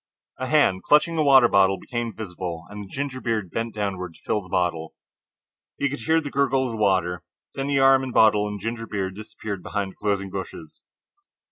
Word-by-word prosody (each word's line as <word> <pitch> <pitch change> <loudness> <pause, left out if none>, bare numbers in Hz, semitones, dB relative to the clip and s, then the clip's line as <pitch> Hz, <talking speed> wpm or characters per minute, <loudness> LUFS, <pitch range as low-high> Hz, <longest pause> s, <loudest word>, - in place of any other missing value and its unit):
A 130 - -2
hand, 130 -11 +3
clutching 165 +3 +3
a - - +4
water 135 -4 +7
bottle, 95 -2 +4
became 120 0 -4
visible 90 -5 -6
and 105 0 -7
the - - -11
ginger 135 +3 -4
beard 110 -7 -2
bent 115 0 -3
downward 95 -5 -3
to - - -20
fill 105 - 0
the 90 - -15
bottle. 85 -3 -1 0.8
He 140 - 0
could 145 - -4
hear 160 0 +2
the 145 -3 -6
gurgle 135 -1 +2
of 125 - -3
the 115 - -5
water. 90 -4 +1 0.3
Then 135 +1 -3
arm 135 0 +6
and 130 - -4
bottle 105 -2 +4
and 105 0 -5
ginger 115 +2 -4
beard 95 -2 -3
disappeared 110 -2 -7
behind 100 0 -3
the - - -21
closing 100 -2 -1
bushes. - - -8
105 Hz, 200 wpm, -24 LUFS, 95-130 Hz, 0.8 s, water